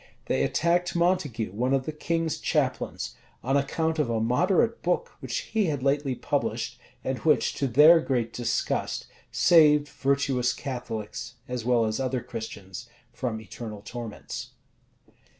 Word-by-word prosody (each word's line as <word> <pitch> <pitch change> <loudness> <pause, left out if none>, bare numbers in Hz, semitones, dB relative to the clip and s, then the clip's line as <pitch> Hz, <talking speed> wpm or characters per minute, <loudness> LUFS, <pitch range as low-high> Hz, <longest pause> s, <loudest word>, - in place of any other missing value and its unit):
[] - - -36
They - - 0
attacked 175 +2 +1
Montague, 155 - +1
one 125 +7 +1
of 130 -1 -1
the - - -2
king's 165 +1 -1
chaplains, - - -1 0.3
on 135 +3 +1
account 160 +3 0
of 145 -6 +1
a 115 -1 +1
moderate 180 - +2
book 180 0 0
which 130 -3 -4
he 220 -2 +3
had 145 -6 -1
lately 140 -1 +1
published, - - -2 0.2
and - - -2
which, - - +2
to 135 - -1
their 150 +7 +7
great 120 -7 -1
disgust, 120 -1 -1 0.3
saved 150 -4 +5
virtuous 135 -3 +1
Catholics, 115 -4 -5
as 125 -2 -4
well 120 -2 +3
as 110 +2 -1
other 130 -2 -1
Christians, 100 -5 -7 0.2
from 115 -4 -3
eternal 110 -1 -8
torments. 120 -2 -7
135 Hz, 145 wpm, -27 LUFS, 115-155 Hz, 0.3 s, their